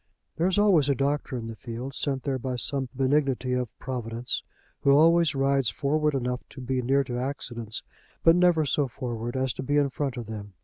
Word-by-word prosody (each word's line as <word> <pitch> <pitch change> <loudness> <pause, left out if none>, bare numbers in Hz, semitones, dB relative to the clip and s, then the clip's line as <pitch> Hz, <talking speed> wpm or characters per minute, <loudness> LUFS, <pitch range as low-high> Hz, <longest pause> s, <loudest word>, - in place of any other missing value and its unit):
There 170 +3 +2
is 190 - +1
always 185 -9 +4
a 140 - +3
doctor 140 0 -1
in 115 - -5
the 115 0 -6
field, 120 +4 -6
sent 135 -2 -1
there 135 -2 -1
by 130 0 -3
some 130 +1 -1
benignity 135 -1 +1
of 125 -2 -1
providence, 120 -2 -4 0.4
who - - +1
always 160 +1 +5
rides 135 -3 +2
forward 150 +7 0
enough 125 -1 -1
to 140 - -11
be 130 0 -1
near 135 +3 +2
to 125 -2 -4
accidents, 120 -4 -4 0.4
but 165 0 +7
never 175 -3 +4
so 145 0 +1
forward 120 0 -4
as 130 -2 0
to - - -6
be 145 +2 0
in 140 -2 +2
front 135 -2 -3
of 120 - -4
them. 105 -2 -7
135 Hz, 205 wpm, -27 LUFS, 125-145 Hz, 0.4 s, but